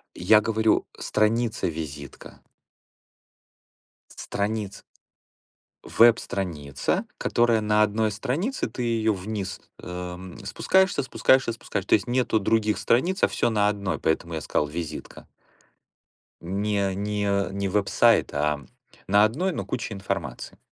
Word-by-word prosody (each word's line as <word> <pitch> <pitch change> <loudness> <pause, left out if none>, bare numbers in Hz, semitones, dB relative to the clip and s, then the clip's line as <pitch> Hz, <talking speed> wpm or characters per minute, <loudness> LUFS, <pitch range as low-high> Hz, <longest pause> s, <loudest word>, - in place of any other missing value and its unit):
Я 105 +5 +5
говорю: 110 0 +1
"Страница-визитка". 85 - -2 1.8
Страница. 100 -1 -3 1.0
Веб-страница, 90 - +1
которая 120 -2 +2
на 105 0 +3
1 110 +1 +1
странице, 145 - -2
ты 125 - -7
её 115 -2 +1
вниз, 100 0 -5 0.2
эм, 90 +2 -7
спускаешься, 190 - +2
спускаешься, 130 0 +3
спускаешься. 100 -4 -5
То - - +4
есть 105 +3 -2
нету 120 -3 +1
других 110 +1 +1
страниц, 175 - +1
а - - +7
всё 120 - 0
на 105 -2 +2
1, 100 -2 -2
поэтому 85 +1 -1
я 80 - -3
сказал: 75 - 0
"Визитка". 80 0 -7 1.1
Не, 100 +2 -1
не 100 -2 -1
не 100 0 -2
веб-сайт, 100 +1 +3
а 75 0 0 0.4
на 100 +2 +5
1, 160 - +1
но - - -4
куча 115 -2 -4
информации. 95 -1 -5
105 Hz, 115 wpm, -25 LUFS, 95-115 Hz, 1.8 s, а